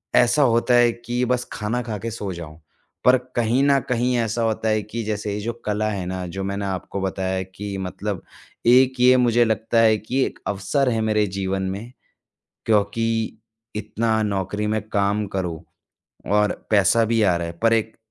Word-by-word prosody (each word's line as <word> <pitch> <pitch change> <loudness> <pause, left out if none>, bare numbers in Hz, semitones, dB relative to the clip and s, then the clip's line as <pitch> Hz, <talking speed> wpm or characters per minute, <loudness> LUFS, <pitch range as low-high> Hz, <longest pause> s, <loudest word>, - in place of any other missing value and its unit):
ऐसा 125 +5 +4
होता 120 -2 +3
है 120 -1 +5
कि 120 +1 -3
बस 125 0 0
खाना 110 +4 -2
खा 110 -3 -4
के 115 +4 -5
सो 105 -3 -4
जाऊँ। 80 -3 -9 0.5
पर 125 +1 +7 0.2
कहीं 120 +2 +2
न 140 -1 +4
कहीं 125 +1 +1
ऐसा 115 0 -1
होता 110 0 0
है 110 0 +2
कि 115 +3 -5
जैसे 105 -1 -3
ये 105 - -3
जो 115 +3 -2
कला 105 0 0
है 100 -4 -3
ना 90 0 -4
जो 95 +3 -5
मैंने 100 +1 -3
आपको 95 0 -4
बताया 95 0 -2
है 95 - -1
कि 100 -1 -5
मतलब 95 +1 -4 0.5
एक 130 +1 +5
ये 125 +1 +6
मुझे 120 -1 +4
लगता 110 +1 +1
है 110 -1 +5
कि 125 +6 -2
एक - - -7
अवसर 105 +8 0
है 115 -2 0
मेरे 110 -1 +2
जीवन 95 0 -1
में 115 +5 -8 0.8
क्योंकि 105 +1 +2 0.7
इतना 110 +1 0
नौकरी 105 0 -2
में 110 +1 0
काम 105 0 0
करो 85 -4 -3 0.7
और 105 0 +3 0.2
पैसा 105 +2 +4
भी 115 -1 +3
आ 95 -4 +4
रहा 85 0 -3
है 85 - -5
पर 115 0 +4
एक 110 -1 0
110 Hz, 190 wpm, -22 LUFS, 100-115 Hz, 0.8 s, पर